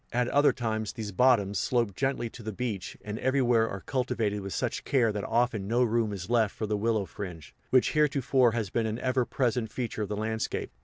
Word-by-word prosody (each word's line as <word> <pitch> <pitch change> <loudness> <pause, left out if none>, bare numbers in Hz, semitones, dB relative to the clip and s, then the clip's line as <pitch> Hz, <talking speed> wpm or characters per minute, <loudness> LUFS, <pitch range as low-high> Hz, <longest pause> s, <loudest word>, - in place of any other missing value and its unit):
At 120 +1 +1
other 145 +1 +5
times, 110 -3 -3
these 110 -4 -5
bottoms 100 -2 +3
slope 115 -6 0
gently 135 -3 -1
to - - -11
the 110 0 -4
beach 105 -4 -4
and 105 +1 -4
everywhere 125 -4 +2
are 95 - -6
cultivated 120 -6 -1
with 100 0 -6
such - - -2
care 120 -5 +2
that 105 -1 -3
often 115 -3 0
no 120 +3 +3
room 115 -2 +1
is 95 -3 -5
left 115 -3 +2
for 110 - -3
the 105 0 -1
willow 110 -1 0
fringe, 90 -7 -8 0.2
which 130 -1 +4
heretofore 135 -5 +3
has 110 -5 -2
been 115 -2 0
an 110 +1 -2
ever 130 0 0
present 120 -4 -1
feature 120 -3 -3
of 105 - -3
the 105 - -3
landscape. 110 +1 -2
115 Hz, 210 wpm, -28 LUFS, 105-125 Hz, 0.2 s, other